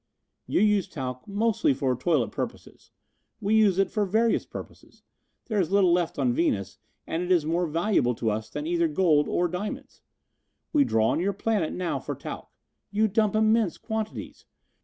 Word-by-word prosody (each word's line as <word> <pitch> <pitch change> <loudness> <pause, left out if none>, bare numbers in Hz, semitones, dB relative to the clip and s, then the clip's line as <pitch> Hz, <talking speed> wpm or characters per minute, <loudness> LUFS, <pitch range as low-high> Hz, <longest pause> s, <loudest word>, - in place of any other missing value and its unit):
"You - - +1
use 210 -3 +3
talc 125 -3 -6
mostly 205 -8 +1
for 130 -1 0
toilet 130 -2 +1
purposes. - - -7 0.5
We 205 +2 0
use 210 -4 +4
it 195 - +2
for 210 - 0
various 220 +4 +1
purposes. - - -11 0.4
There 215 -4 -1
is 170 - -2
little 195 -3 +4
left 175 -2 0
on 130 -4 +1
Venus, 100 - -1 0.3
and 165 - -2
it 180 +1 -2
is 170 -4 +3
more 170 +2 0
valuable 165 - +1
to 110 -1 -1
us 110 +1 -4
than 295 - -5
either 340 0 +1
gold 170 - +2
or 175 - +1
diamonds. 180 +5 -6 0.7
We 290 -2 +4
draw 110 - +2
on - - +1
your 195 +3 0
planet 205 -4 -1
now 180 -2 -2
for - - -5
talc. - - -8 0.4
You 215 +2 +2
dump 215 0 +1
immense 220 -3 +2
quantities. 220 -1 -5
185 Hz, 175 wpm, -26 LUFS, 155-215 Hz, 0.7 s, use